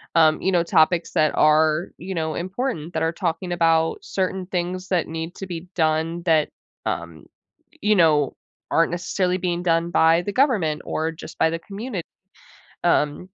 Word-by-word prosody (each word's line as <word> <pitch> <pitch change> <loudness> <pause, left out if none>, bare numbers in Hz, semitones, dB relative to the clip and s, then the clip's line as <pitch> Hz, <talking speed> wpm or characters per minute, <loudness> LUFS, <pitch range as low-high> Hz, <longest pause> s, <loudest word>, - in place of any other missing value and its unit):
um, 155 -1 +5
you 190 - +1
know, 175 -2 +3
topics 165 +1 +2
that 155 -1 +3
are, 155 +2 +3
you 190 +3 -6
know, 160 -2 -2
important, 185 - -3
that - - -1
are 165 - +1
talking 175 0 -3
about 165 -1 +2
certain 190 - -2
things 185 0 -3
that 180 -3 +1
need 165 +2 -5
to 195 - -7
be 175 0 -6
done 160 +1 0
that, 160 -3 +3 0.4
um, 85 -3 -4 0.6
you 210 0 +3
know, 155 -5 +3 0.3
aren't 165 0 +2
necessarily 180 +1 -1
being 175 -1 -2
done 165 0 +1
by 165 0 +4
the 205 - -4
government, 200 - +2
or 160 +1 -1
just 160 - -11
by 160 - +4
the 165 - -2
community. 200 -1 -6 0.8
Um 150 -4 +2
170 Hz, 165 wpm, -23 LUFS, 160-185 Hz, 0.8 s, um